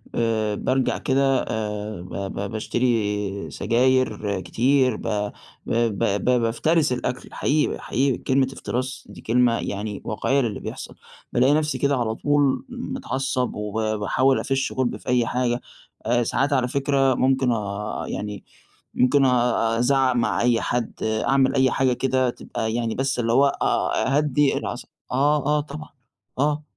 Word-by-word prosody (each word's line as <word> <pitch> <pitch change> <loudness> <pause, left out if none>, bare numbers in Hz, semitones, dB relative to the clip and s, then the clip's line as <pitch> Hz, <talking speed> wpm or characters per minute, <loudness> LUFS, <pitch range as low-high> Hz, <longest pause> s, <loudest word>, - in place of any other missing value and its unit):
آآ 110 -2 0
بارجع 130 +4 0
كده 135 0 +2
آآ 105 -3 -4
ب 90 - -11
ب 100 0 -4
باشتري 105 -3 -1
سجاير 120 -3 +1
كتير 130 +2 +2
ب 105 -1 -2 0.4
ب 115 -3 0 0.4
بافترس 145 +7 +1
الأكل 125 0 -4
حقيقي 150 +2 0
حقيقي 135 0 0
كلمة 130 0 +1
افتراس 130 0 -4
دي - - -11
كلمة 120 0 +2
يعني 100 0 -4
واقعية 135 +6 +1
للي 115 -5 -2
بيحصل - - -7 0.4
بالاقي 130 +4 +4
نفسي 155 0 +1
كده 140 -1 +1
على 110 -2 -1
طول 145 - +1
متعصب 135 - -2
وب 110 +1 -2
باحاول 130 +6 +2
أفش 135 -1 -1
غُلبي 130 -2 -1
في - - -20
أي 125 -1 +3
حاجة، 125 0 -1 0.4
آآ 120 +1 +2
ساعات 140 +5 0
على 130 -2 +2
فكرة 135 0 +2
ممكن 130 -1 +2
آآ 105 -1 -3
يعني 105 -1 -5 0.5
ممكن 135 +2 +3
أ - - +5
أ 120 -2 +2
أ - - -1
أزعق 130 +1 +3
مع 120 - +1
أي 120 -1 +2
حد 120 -2 -2
أعمل 130 +5 +2
أي 130 -1 +3
حاجة 130 -2 +2
كده 130 0 +1
تبقى 110 -2 -4
يعني 115 -1 -1
بس 135 -1 -1
اللي 115 -1 +1
هو 135 +3 +5
أ 135 0 0
أهدي 145 -1 +2
العص - - -5 0.3
آه، 145 +3 +2
آه 150 +1 +2
طبعًا 150 +1 -9 0.5
آه، 150 +2 +1
125 Hz, 150 wpm, -23 LUFS, 110-135 Hz, 0.5 s, أ